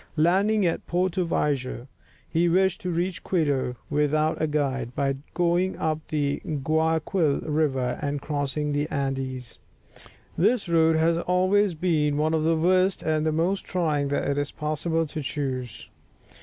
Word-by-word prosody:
Landing 195 +6 +3
at 170 - -1
Porto 180 +1 0
Viejo, 135 -6 -1 0.4
he 170 +1 +1
wished 190 +3 +2
to 180 - -3
reach 175 +1 -2
Quito 145 -8 0
without 155 +2 +1
a 155 - +2
guide, 135 -5 -1
by 135 -1 0 0.2
going 175 +2 +1
up 155 -1 -1
the 145 -3 -1
Guayaquil 160 +2 0
River 135 -5 0
and 145 0 -2
crossing 145 0 -2
the 145 +2 -1
Andes. 135 -3 -3 0.8
This 215 +4 +2
road 165 -1 +4
has 165 +1 +2
always 185 +2 +2
been 155 -4 +1
one 155 +1 +1
of 160 -1 +1
the 165 0 +2
worst 185 +3 +2
and 155 0 +1
most 175 +5 0
trying 155 -6 0
that 140 - -1
it 140 0 0
is 145 0 -2
possible 160 +2 -1
to 155 0 -5
choose. 130 -4 -4
155 Hz, 145 wpm, -25 LUFS, 145-175 Hz, 0.8 s, road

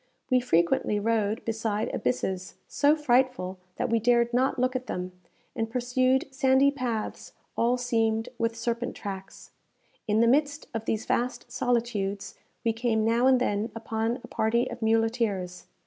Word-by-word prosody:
We 255 - +5
frequently 190 -2 +2
rode 220 0 0
beside 220 -1 -2
abysses 180 +11 -2
so 290 +1 +3
frightful 255 -10 +1 0.2
that - - -1
we 230 - +3
dared 235 +1 +3
not 260 +2 +2
look 255 +1 +1
at 255 -1 -3
them, 180 -2 -4 0.4
and 225 0 -2
pursued 255 +2 +1
sandy 265 +1 +4
paths 245 -6 -4 0.2
all 240 +2 +2
seamed 225 -2 0
with 230 0 0
serpent 235 +1 -2
tracks. 195 -2 -8 0.6
In 215 +1 +2
the 230 - +5
midst 290 +4 +2
of 225 -1 -4
these 220 0 -1
vast 245 +2 -2
solitudes, 225 -5 -1 0.3
we 230 - +2
came 225 -1 0
now 235 +3 +3
and 260 -1 +5
then 220 -2 -1
upon 225 +2 -2
a - - -9
party 235 +3 +1
of 240 0 -8
muleteers. 220 -5 0
230 Hz, 150 wpm, -27 LUFS, 220-250 Hz, 0.6 s, We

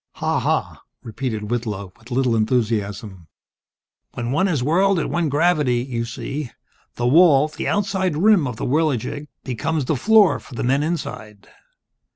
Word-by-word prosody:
"Ha - - -1
ha," - - -1 0.2
repeated 110 -2 -4
Whitlow, 105 -6 -3
with 115 +1 -17
little 125 -2 +1
enthusiasm. 105 -5 -1 0.9
"When 120 0 -3
one 165 +8 +2
is 150 -9 0
whirled 185 +7 +2
at 165 - -2
one 165 -1 0
gravity, 150 -3 +2
you 120 -3 -3
see, 135 +4 -5 0.5
the 120 - -2
wall 150 +1 +5
the - - -5
outside 190 -5 0
rim 195 -4 +4
of 125 - -5
the - - -4
Whirligig, 145 0 -1 0.2
becomes 145 +4 -2
the 155 - 0
floor 210 - +4
for 130 - -13
the - - -3
men 135 +3 +2
inside. 110 - -5
135 Hz, 155 wpm, -21 LUFS, 115-160 Hz, 0.9 s, wall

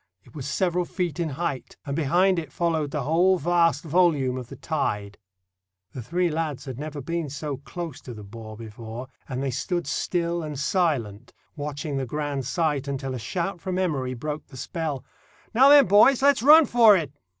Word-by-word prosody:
It 120 - -20
was 140 -3 -6
several 175 +4 0
feet 175 -2 -3
in 165 -2 -1
height, 145 -1 -4
and 140 -1 -3
behind 175 +5 +2
it 155 -4 -8
followed 160 -3 0
the 145 -2 -3
whole 175 +6 +3
vast 170 +1 +2
volume 155 -6 +2
of 125 -2 -6
the - - -10
tide. 105 -10 -3 0.7
The 125 - -7
three 175 +9 0
lads 155 -4 -3
had 130 -2 -7
never 150 -1 -5
been 165 0 -3
so 145 0 -4
close 170 +4 -7
to 120 - -9
the 105 - -9
bore 110 +1 -10
before, 115 +2 -8 0.2
and 130 0 -3
they 135 - -1
stood 170 +7 -2
still 170 +3 -1
and 150 -3 -5
silent 135 - -1 0.2
watching 145 0 -4
the 135 -1 -2
grand 145 -1 -3
sight 145 -2 0
until 135 -1 -3
a 125 - -4
shout 175 - -3
from 185 -1 -3
Emory 140 -9 -1
broke 150 +4 -5
the 130 - -13
spell. 145 -1 -4 0.5
"Now 265 +5 +6
then, 285 -1 +8
boys, 215 +8 +5
let's 280 -4 +5
run 305 +5 +8
for 230 -6 +6
it." 150 -5 -4
150 Hz, 185 wpm, -25 LUFS, 130-175 Hz, 0.7 s, then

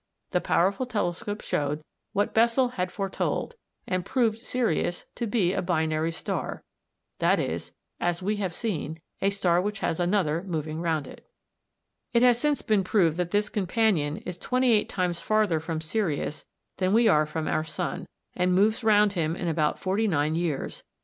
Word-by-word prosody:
The 180 - +1
powerful 195 +8 +1
telescope 205 -1 -2
showed 150 +1 -1 0.3
what 205 - 0
Bessel 235 +3 +4
had 180 -6 -3
foretold, 195 - -2 0.3
and 185 -1 -1
proved 225 0 +1
Sirius 225 -8 -1
to 235 - -3
be 200 -5 +2
a - - 0
"binary" 160 -2 0
star 165 - -4 0.6
that - - +3
is, - - -3 0.3
as 175 +1 -1
we 210 +2 0
have 190 -4 -2
seen, 160 - -3 0.2
a 195 - +3
star 180 -3 +2
which 200 +1 -3
has 165 - -1
another 175 -3 +1
moving 160 -3 -3
round 160 -3 0
it. - - -13 0.9
It 235 0 +4
has 245 -1 +5
since 295 0 +1
been 215 -4 +2
proved 180 -5 +2
that 180 -1 -1
this 205 +2 +1
companion 190 -7 +1
is 180 -1 -5
twenty 255 +2 +2
eight 215 -2 +3
times 180 -2 -1
farther 215 -7 +2
from 160 0 -4
Sirius 160 -3 -2 0.3
than 185 0 +1
we 230 +1 +5
are 155 -4 +4
from 155 +1 -3
our 155 - +1
sun, 160 - -4 0.3
and 180 0 +2
moves 215 +5 +3
round 210 -2 +5
him 165 -3 0
in 175 - -3
about 155 -2 +1
forty 200 +4 0
nine 155 -4 +1
years. 165 -4 -2
185 Hz, 170 wpm, -27 LUFS, 165-215 Hz, 0.9 s, has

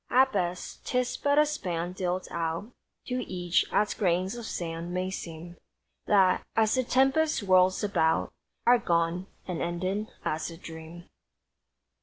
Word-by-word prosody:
At 265 +1 +5
best, 180 -2 -3
'tis 250 -1 0
but 285 0 +1
a 300 - +7
span 180 - -3
dealt 185 0 -2
out 170 +6 -3 0.3
To 250 0 -2
each; 175 -1 +1
as 210 - +2
grains 185 0 +1
of 235 -2 -6
sand 170 0 -4
may 185 +1 -1
seem 170 -1 -7 0.5
That, 190 -3 +4
as 220 -1 +3
the 255 - +2
tempest 270 +5 +2
whirls 185 0 +4
about, 170 -6 +1 0.3
Are 245 0 +6
gone, 170 -1 0 0.2
and 180 -3 -3
ended 185 +5 -2 0.2
as 155 +3 -1
a 165 - -9
dream! 165 +1 -10
185 Hz, 145 wpm, -28 LUFS, 170-220 Hz, 0.5 s, a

